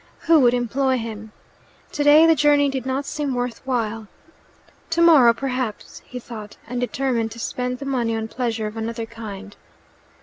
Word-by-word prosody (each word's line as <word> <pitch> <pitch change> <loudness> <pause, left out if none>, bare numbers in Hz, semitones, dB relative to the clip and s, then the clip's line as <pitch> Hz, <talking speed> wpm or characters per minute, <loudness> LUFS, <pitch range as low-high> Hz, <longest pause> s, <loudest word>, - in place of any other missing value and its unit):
Who 325 -1 +5
would 245 -2 +4
employ 260 +2 0
him? 220 -2 -7 0.6
Today 295 +2 +6
the 330 - +6
journey 290 -1 +3
did 265 -2 -4
not 265 +2 -2
seem 290 -3 -3
worth 245 -1 -3
while. 225 -4 -2 0.8
"Tomorrow, 325 -8 +6
perhaps," 255 -3 -4
he 250 - -8
thought, 220 -4 -9
and 245 +1 -3
determined 245 -2 -1
to 235 - -11
spend 250 +2 -3
the 275 - -8
money 240 -4 -1
on 220 0 -3
pleasure 230 -2 -3
of 210 +1 -6
another 225 0 -4
kind. 210 -3 -9
245 Hz, 160 wpm, -22 LUFS, 225-270 Hz, 0.8 s, Today